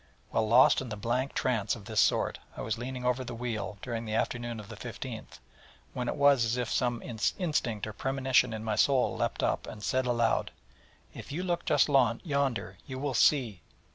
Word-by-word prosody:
_' - - -32 0.3
Well, 110 -1 +2
lost 120 +5 +6
in 125 -4 -7
a - - -2
blank 120 +6 -2
trance 120 -1 0
of 105 -4 -12
this 110 -1 -1
sort, - - +1 0.2
I - - -4
was 110 +1 -2
leaning 125 0 -5
over 125 +1 +1
the 120 -1 -6
wheel 115 -3 -4
during 115 -2 -3
the 110 0 -3
afternoon 120 0 -2
of 105 - -9
the 115 - -9
15th, 115 0 -7 0.6
when 125 -1 -3
it - - -1
was 140 -4 +5
as 115 +2 0
if 120 -2 -2
some 120 -2 0
instinct 120 - -1
or 110 - -6
premonition 130 0 +2
in 110 0 -5
my 110 -1 -1
soul 135 -3 +3
leapt - - -2
up, - - 0
and 105 - -9
said 130 +2 0
aloud: 120 -2 +1 0.6
'If - - -9
you 170 +5 -3
look 175 -2 -1
just - - +4
yonder, 135 - +1
_you 130 0 -5
will 140 -1 -2
see...! 115 - +3
120 Hz, 200 wpm, -30 LUFS, 110-130 Hz, 0.6 s, lost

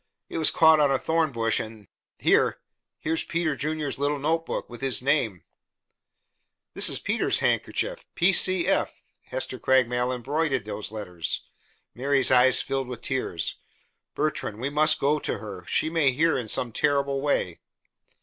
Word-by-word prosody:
It - - -4
was 160 - +5
caught 160 -1 +5
on 145 -2 +4
a 135 - +2
thorn 160 +1 0
bush, 115 -2 +1
and 110 -3 -8 0.3
here - - +2 0.4
here's 160 +1 -2
Peter 165 -3 -1
Junior's 150 -1 -3
little 145 +1 0
notebook, 160 +3 -2
with 120 0 -11
his 135 -2 0
name 125 - 0 0.6
" - - -54
"This - - +2
is - - 0
Peter's - - 0
handkerchief. - - -1
P. 180 +3 +3
C. 185 0 +4
J. 190 +3 +2 0.4
Hester - - -4
Craigmile 125 -1 +2
embroidered 135 0 -1
those 105 0 -5
letters." 90 - -3 0.5
Mary's 135 +1 +1
eyes 130 0 +5
filled 135 -1 -2
with 125 -1 -7
tears. 90 -11 -2 0.6
"Bertrand, 150 -8 -2
we 135 +4 -2
must 155 +1 +3
go 150 +2 +2
to - - -2
her. 100 -4 -9
She - - +1
may 160 -4 +2
hear 160 +6 +2
in 120 -4 -3
some 120 +2 0
terrible 140 +1 0
way." 115 - -1
135 Hz, 160 wpm, -25 LUFS, 120-155 Hz, 0.6 s, was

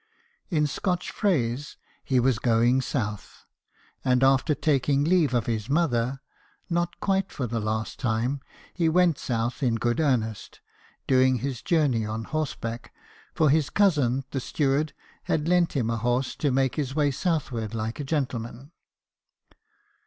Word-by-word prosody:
In 155 -5 +2
Scotch 180 +4 -2
phrase, 145 - -1 0.3
he 130 -2 +2
was 125 -2 +2
going 120 +2 +3
south. 105 -6 -4 0.6
And 125 0 +2
after 135 +3 +3
taking 140 -1 +1
leave 160 -5 +3
of 120 - +1
his 110 0 -2
mother 135 -4 +1 0.5
(not 175 0 -1
quite 195 -1 0
for 130 - -3
the 115 0 -2
last 110 0 -3
time) 125 +3 -1 0.3
he 165 -2 +1
went 175 -2 +3
south 120 +1 -2
in 120 -4 +2
good 120 +3 0
earnest, 115 -8 -1 0.5
doing 130 -1 +4
this 130 -1 -4
journey 145 -9 +2
on 110 +1 -4
horseback; 120 -5 -4 0.4
for 155 -3 +4
his 150 -1 +2
cousin 145 -10 +2
the 135 - -1
steward 145 +3 0 0.3
had 155 0 0
lent 175 -1 +3
him 115 -5 0
a 115 - -1
horse 120 +3 0
to 145 - +1
make 130 +1 +1
his 135 -3 -2
way 145 -2 +2
southward 130 - -2
like 110 +3 -3
a - - -2
gentleman. 130 -2 -3
135 Hz, 145 wpm, -26 LUFS, 120-155 Hz, 0.6 s, doing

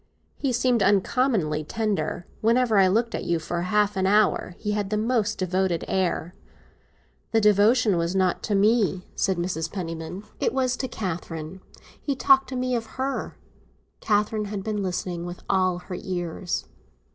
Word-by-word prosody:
"He 275 - -1
seemed 245 -1 +2
uncommonly 195 - +2
tender. 205 -1 -2 0.2
Whenever 230 -1 +3
I 190 - +6
looked 230 +5 +1
at - - -3
you, 170 - +1
for 170 +2 -3
half 205 +2 +1
an 190 0 +1
hour, 205 -3 +2
he 210 - -3
had 205 -2 -1
the 210 - 0
most 220 -1 0
devoted 185 -2 0
air." 180 -2 -1 1.0
"The 225 - +5
devotion 210 0 +4
was 170 +2 -1
not 185 -2 +1
to 205 - 0
me," 200 -2 +2
said 190 -2 +1
Mrs. 170 -2 -2
Penniman. 165 0 -5 0.2
"It - - 0
was 255 -1 +1
to 260 - -2
Catherine; 175 -5 -5 0.4
he 280 - -1
talked 270 0 +4
to 260 - -5
me 255 0 -1
of 225 -1 -3
her." 265 +1 -3 0.6
Catherine 210 0 +1
had 200 -1 -5
been 210 -1 -2
listening 180 -2 -3
with 175 0 -8
all 185 -2 +2
her 180 0 -7
ears. 175 -1 -3
200 Hz, 160 wpm, -25 LUFS, 180-225 Hz, 1.0 s, I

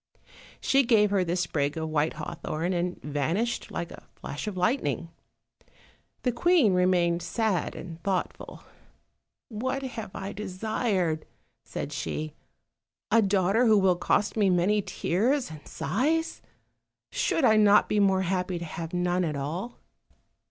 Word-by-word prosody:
She 275 - +3
gave 220 -5 +4
her 195 -2 +3
the 175 0 -1
sprig 145 -4 -1
of 160 0 -2
white 155 0 +1
hawthorn, 165 +2 -3
and 175 0 -2
vanished 160 - -1
like 170 0 -4
a - - -12
flash 145 +9 -6
of 200 -3 -4
lightning. 180 - 0 1.1
The 250 - +2
queen 275 - +4
remained 180 -2 +2
sad 200 +1 -1
and 170 -2 -8
thoughtful. 190 -1 -3 0.9
"What 260 +4 -3
have 235 -6 -5
I 195 +1 -5
desired," 190 -5 -1 0.4
said - - -5
she 155 -1 -4 0.8
"a 230 +1 +6
daughter 200 +4 +3
who 215 -1 +6
will 190 -2 +4
cost 205 +3 +1
me 205 -3 +3
many 185 +4 +3
tears 240 - 0
and 155 -2 -11
sighs? 315 - -1 0.7
should 310 - +1
I 220 - +6
not 210 -1 +6
be 210 - +1
more 190 -2 +3
happy 180 0 -1
to 170 - -5
have 165 +1 -6
none 180 0 +1
at 155 -3 -1
all?" 165 - -4
185 Hz, 140 wpm, -27 LUFS, 170-220 Hz, 1.1 s, a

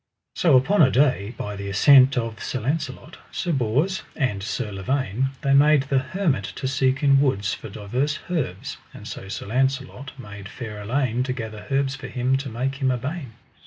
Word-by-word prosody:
So 155 -7 +5
upon 190 +10 +3
a 135 - +7
day, 125 -5 +2
by 105 0 -4
the 100 0 -5
assent 130 +6 +6
of 115 -2 -3
Sir 130 - -3
Launcelot, 145 +3 -3
Sir 175 - -2
Bors, 140 - +1
and 115 -9 -1
Sir 110 +1 -3
Lavaine, 130 +4 -1
they 140 - +2
made 145 0 +5
the 140 -1 +1
hermit 145 +2 -1
to 130 - -3
seek 130 +1 +1
in 140 -1 +5
woods 100 -8 +1
for - - -7
divers 125 +9 -2
herbs, 130 - -3 0.2
and - - -10
so 95 - -7
Sir 95 - -5
Launcelot 130 +3 -1
made 100 -5 -9
fair 110 -4 -7
Elaine 125 +2 0
to 130 0 -1
gather 110 -4 -7
herbs 135 -1 +1
for 135 -1 -7
him 125 +1 0
to 135 0 -5
make 130 +4 -2
him 130 - +3
a 125 - +1
bain. 135 0 -5
130 Hz, 190 wpm, -24 LUFS, 110-140 Hz, 0.2 s, a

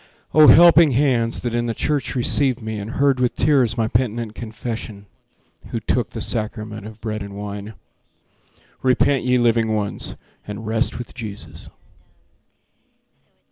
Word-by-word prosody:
Oh, 155 -1 +7
helping 170 -3 +7
hands 120 -3 +1
that 120 -2 -3
in 120 0 -1
the 115 - -2
church 145 +1 -2
received 130 +1 +3
me 110 -2 -5
And 105 +4 -6
heard 140 -2 +2
with 125 -1 0
tears 130 -6 +2
my 110 -1 +1
penitent 115 -1 -1
confession, 110 -2 -7 0.6
Who - - -4
took - - -1
the - - -6
sacrament 110 -1 -4
of 110 0 -12
bread 110 -1 -4
and 100 0 -8
wine! 105 +1 -7 1.1
Repent, 130 +1 +2
ye 125 0 +3
living 115 -2 +2
ones, 105 -2 -1 0.3
and 105 +2 -7
rest 110 +2 -1
with 120 - -8
Jesus. 110 -4 -8
115 Hz, 140 wpm, -21 LUFS, 110-125 Hz, 1.1 s, Oh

